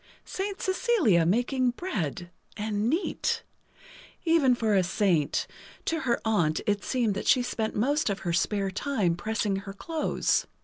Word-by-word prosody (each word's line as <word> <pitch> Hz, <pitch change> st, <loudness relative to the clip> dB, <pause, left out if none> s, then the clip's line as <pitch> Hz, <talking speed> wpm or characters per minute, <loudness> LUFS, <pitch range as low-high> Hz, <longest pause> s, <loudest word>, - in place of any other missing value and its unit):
Saint 390 Hz, +1 st, -4 dB
Cecilia 375 Hz, -, +2 dB
making 245 Hz, +6 st, +2 dB
bread! 185 Hz, -, -4 dB, 0.3 s
And 210 Hz, +1 st, -1 dB
neat! 330 Hz, +8 st, -1 dB, 0.8 s
Even 315 Hz, -7 st, +4 dB
for 220 Hz, -3 st, 0 dB
a 195 Hz, -, +5 dB
saint; 175 Hz, -5 st, +1 dB, 0.4 s
to 325 Hz, -, 0 dB
her 240 Hz, -6 st, 0 dB
aunt 175 Hz, -9 st, +2 dB
it 205 Hz, -1 st, 0 dB
seemed 240 Hz, -5 st, 0 dB
that 200 Hz, -, -4 dB
she 250 Hz, -, +5 dB
spent 220 Hz, -2 st, -2 dB
most 280 Hz, +5 st, +1 dB
of 200 Hz, -, -2 dB
her 175 Hz, -2 st, -2 dB
spare 195 Hz, +3 st, 0 dB
time 205 Hz, -5 st, 0 dB
pressing 210 Hz, +1 st, -1 dB
her 195 Hz, 0 st, -7 dB
clothes. 315 Hz, +9 st, 0 dB
220 Hz, 145 wpm, -27 LUFS, 195-270 Hz, 0.8 s, a